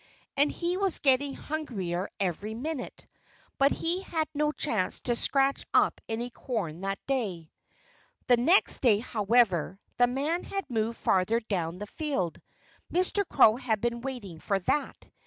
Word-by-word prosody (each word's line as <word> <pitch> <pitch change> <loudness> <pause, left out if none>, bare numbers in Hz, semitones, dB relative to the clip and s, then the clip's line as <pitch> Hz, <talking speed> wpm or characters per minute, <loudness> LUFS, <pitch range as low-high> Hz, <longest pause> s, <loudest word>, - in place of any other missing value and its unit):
And 285 +1 +3
he 350 +1 -2
was 390 -3 +4
getting 275 0 +2
hungrier 200 - -4
every 200 +3 -2
minute. 280 +2 -5 0.5
But 275 +1 +5
he 345 +3 -1
had 320 -5 -2
no 300 0 +1
chance 220 -12 -1
to 240 - +2
scratch 275 +3 +1
up - - +3
any 235 +2 -3
corn 195 - -4
that 195 0 -2
day. 200 - -2 0.7
The 245 - +5
next 325 +11 +4
day, 230 -6 +5
however, 210 -5 +1 0.2
the 245 - +5
men 290 +8 -1
had 390 -1 -4
moved 225 0 -1
further 190 +5 +2
down 180 -7 -3
the 205 - -6
field. 215 - -3 0.5
Mr. 370 +3 +1
Crow 220 +1 +6
had 235 -5 -1
been 235 +2 -2
waiting 235 -11 -6
for 195 +4 0
that. 290 +11 -2
240 Hz, 150 wpm, -28 LUFS, 200-285 Hz, 0.7 s, Crow